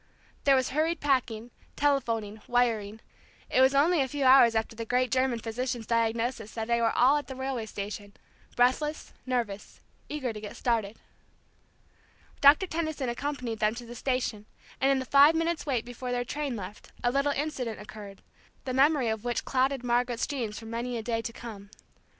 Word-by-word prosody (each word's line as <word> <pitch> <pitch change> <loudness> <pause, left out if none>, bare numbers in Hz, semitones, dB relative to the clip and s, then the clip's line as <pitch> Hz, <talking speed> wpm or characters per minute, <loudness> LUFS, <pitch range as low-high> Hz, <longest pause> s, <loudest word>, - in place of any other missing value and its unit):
There 275 -1 +6
was 260 -1 +1
hurried 320 +4 0
packing, 245 -5 0 0.2
telephoning, 230 -7 0
wiring; 225 -3 0 0.5
it 260 - +4
was 265 +1 +5
only 315 +3 +4
a 265 - +1
few 285 +1 -3
hours 255 -3 +7
after 220 0 -1
the 230 - -4
great 250 +1 0
German 255 -1 +2
physician's 235 +1 -3
diagnosis 230 0 -1
that 220 -1 -3
they 235 0 +1
were 230 -1 +3
all 265 +4 +5
at 290 - -4
the 265 - -7
railway 260 -4 -3
station, 205 0 -6 0.4
breathless, 260 +5 +1
nervous, 230 -6 -3 0.3
eager 265 -6 -3
to 210 - -8
get 210 - -8
started. 225 -3 -1 1.4
Doctor 290 +6 +7
Tenison 315 -6 -2
accompanied 250 -3 -3
them 215 +1 +1
to 240 0 -8
the 235 - -9
station, 240 -4 -2 0.3
and 270 - +3
in 275 - +4
the 260 - -3
five 285 +4 +6
minutes' 330 -1 -1
wait 250 -5 0
before 245 +1 -6
their 245 0 -1
train 285 -1 -3
left, 200 -1 -9
a 245 - +3
little 275 +2 +1
incident 270 -6 -3
occurred, 205 -2 -10 0.4
the 255 - -2
memory 275 -1 +3
of 220 -1 -2
which 240 -1 -2
clouded 265 0 +1
Margaret's 240 -1 +1
dreams 235 -7 -4
for 225 - -9
many 235 +2 -3
a 225 - -5
day 230 0 -1
to 230 - -5
come. 215 -4 -10
245 Hz, 180 wpm, -28 LUFS, 225-275 Hz, 1.4 s, hours